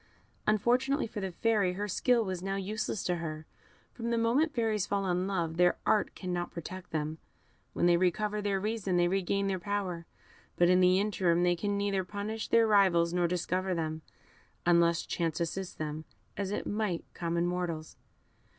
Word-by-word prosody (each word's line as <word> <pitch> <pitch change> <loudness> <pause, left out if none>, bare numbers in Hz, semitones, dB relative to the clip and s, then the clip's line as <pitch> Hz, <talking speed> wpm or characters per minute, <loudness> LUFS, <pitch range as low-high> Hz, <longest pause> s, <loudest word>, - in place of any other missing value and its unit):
Unfortunately 250 +7 +2
for 215 - -6
the 190 -2 -3
Fairy, 205 -1 +1
her 205 +3 -3
skill 235 +4 +2
was 185 -2 -3
now 195 +1 -2
useless 205 0 -3
to 175 -1 0
her 155 -2 -5 0.5
from 235 -1 -4
the 235 - +1
moment 245 +8 +2
Fairies 225 -6 0
fall 200 -1 0
in 180 0 0
love, 170 -4 -2
their 175 0 +4
art 215 - +2
cannot 180 -2 -3
protect 185 +2 -8
them; 155 0 -3 0.5
when - - +1
they 175 0 +5
recover 210 +4 0
their 200 -1 0
reason 205 -3 -1
they 175 0 +4
regain 195 +2 0
their 195 -1 -1
power; 180 -3 -3 0.5
but 175 0 +4
in 180 0 +5
the 185 +1 +5
interim 185 -4 +1
they 175 0 +3
can 205 +3 -1
neither 200 -1 0
punish 205 +3 -4
their 230 0 +4
rivals 185 -5 +4
nor 175 -1 +2
discover 180 +1 -1
them, 160 -1 -3 0.6
unless 170 -1 +3
chance 165 -2 -2
assist 180 +2 -3
them, 155 0 -4 0.3
as 200 -1 -2
it 205 - -3
might 205 -5 -1
common 170 0 -1
mortals. 175 -3 -3
185 Hz, 175 wpm, -30 LUFS, 175-205 Hz, 0.6 s, they